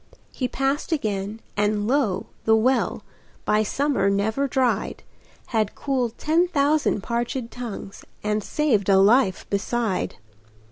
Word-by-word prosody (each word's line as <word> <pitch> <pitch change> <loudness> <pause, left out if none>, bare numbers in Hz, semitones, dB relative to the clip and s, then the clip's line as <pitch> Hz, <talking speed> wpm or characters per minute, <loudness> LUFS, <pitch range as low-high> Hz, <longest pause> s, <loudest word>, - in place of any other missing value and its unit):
He 255 - -1
passed 270 +5 -1
again; 215 -6 -2
and 205 0 +1
lo! 245 -7 +1 0.2
the 220 - +5
well, 255 +4 +1 0.4
By 215 - +3
summer 255 -2 +1
never 220 +8 +1
dried, 260 -2 0 0.5
Had 220 -3 0
cooled 255 -5 -1
ten 330 +4 +2
thousand 290 - +1
parchéd 240 +1 -2
tongues, 230 -5 -7 0.2
And 210 0 0
saved 225 -10 +1
a 195 - +6
life 200 0 +4
beside. 205 0 -1
230 Hz, 125 wpm, -24 LUFS, 205-270 Hz, 0.5 s, a